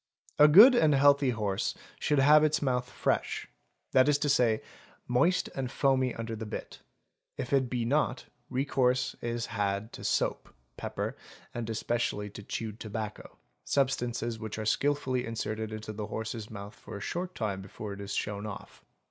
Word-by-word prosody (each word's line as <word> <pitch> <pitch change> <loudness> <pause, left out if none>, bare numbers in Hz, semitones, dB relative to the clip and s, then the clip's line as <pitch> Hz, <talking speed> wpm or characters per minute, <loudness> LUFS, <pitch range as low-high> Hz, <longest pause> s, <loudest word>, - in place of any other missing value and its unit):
$ - - +9
A - - +10
good 210 - +10
and 155 - +4
healthy 140 0 +5
horse 105 -5 -1 0.2
should 150 - +1
have 150 +3 +7
its 155 0 +2
mouth 125 -3 -1
"fresh," - - -1 0.4
that 130 +2 +5
is 145 - +4
to 145 - -1
i 120 -6 +4
say, - - -15 0.5
moist 165 +10 +2
and 130 -2 -3
foamy 130 -2 +1
under 115 0 -4
the 110 0 -6
bit; - - -7 0.6
if 125 - -4
it 130 -2 +3
be 120 -2 -1
not, 135 -1 0 0.2
recourse 130 -1 +1
is 120 -1 -2
had 100 0 -2
to - - -9
soap, - - 0 0.2
_ - - -44
pepper, - - -4 0.4
and 115 -1 -4
especially 110 -2 -1
to 105 - -9
chewed 110 +1 -5
tobacco, 110 -1 -6 0.3
substances 120 -4 0
which 110 -1 -5
are 110 - -3
skilfully 130 +1 +1
it - - -6
inserted 110 -1 -3
into 110 0 -6
the 105 0 -5
horse's 110 0 -5
mouth 100 -1 -8
for - - -9
a - - -7
short 180 - -4
time 100 -6 -2
before 100 +1 -7
it 100 - -8
is 100 -1 -4
shown 105 0 -3
off. 100 - -9
120 Hz, 180 wpm, -30 LUFS, 110-135 Hz, 0.6 s, A